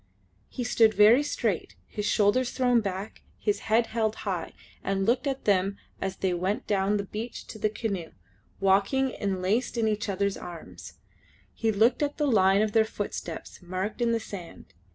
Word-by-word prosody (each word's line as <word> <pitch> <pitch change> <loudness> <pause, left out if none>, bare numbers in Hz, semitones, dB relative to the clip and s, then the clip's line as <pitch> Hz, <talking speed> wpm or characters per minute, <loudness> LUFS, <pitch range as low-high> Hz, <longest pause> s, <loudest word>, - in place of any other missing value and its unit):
He 250 - -4
stood 225 -2 +4
very 215 +6 +7
straight, 295 - -2
his 210 -1 -4
shoulders 220 +5 +3
thrown 245 -3 +2
back, 195 +1 -5 0.2
his 210 -2 0
head 230 +2 +4
held 220 -2 +1
high, 180 -5 -3 0.3
and 195 0 0
looked 245 +6 +2
at 270 -1 -3
them 195 0 +2 0.2
as 190 -1 -2
they 190 -2 0
went 185 +4 -1
down 200 0 +1
the 200 - -2
beach 220 +4 -6
to 220 - -8
the 215 0 +2
canoe, 200 -6 -3 0.5
walking 200 +8 +3
enlaced 200 +5 -1
in 225 -1 +2
each 210 -1 -1
other's 200 0 0
arms. 175 -2 -9 0.6
He 225 -1 0
looked 225 +6 +3
at 290 0 -1
the 300 - +1
line 200 -5 +4
of 215 - -1
their 220 +1 +5
footsteps 205 -6 -6
marked 185 +6 -4
in 235 -1 +3
the 230 - +1
sand. 195 -6 -9
210 Hz, 175 wpm, -27 LUFS, 195-230 Hz, 0.6 s, very